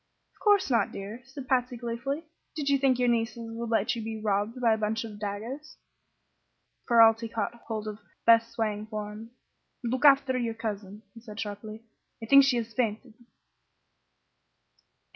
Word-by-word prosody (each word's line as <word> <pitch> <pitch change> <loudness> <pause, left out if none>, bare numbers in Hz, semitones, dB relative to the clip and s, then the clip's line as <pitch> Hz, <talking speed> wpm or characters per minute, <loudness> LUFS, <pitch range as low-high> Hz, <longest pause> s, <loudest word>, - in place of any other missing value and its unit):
"Of - - -29
course 410 -8 +3
not, 235 - +2
dear," 205 +5 -7
said 270 -1 -9
Patsy, 250 -1 +1
gleefully. 240 +6 -3 0.3
"Did 290 -3 -2
you 280 -1 +3
think 265 -2 +3
your 250 0 +2
nieces 230 -1 -1
would 230 0 -5
let 225 +1 +1
you 230 - -4
be 220 0 -5
robbed 210 +3 -1
by 235 -3 +4
a - - 0
bunch 220 +1 -1
of 210 -2 -9
dagoes?" 225 +9 -6 1.1
Ferralti 230 -1 +5
caught 230 0 -2
hold 215 -2 -4
of 210 0 -6 0.3
Beth's 230 0 +6
swaying 215 -1 -2
form. 215 +1 -6 0.5
"Look 245 +3 -2
after 275 -2 +6
your 230 -2 -2
cousin," 210 -2 -5
he 230 - -13
said, 215 -2 -10
sharply. 215 +1 -6 0.4
"I 225 - -7
think 275 +4 +7
she 265 -3 +2
has 230 -1 -4
fainted!" 225 0 -2
230 Hz, 160 wpm, -28 LUFS, 215-250 Hz, 1.1 s, think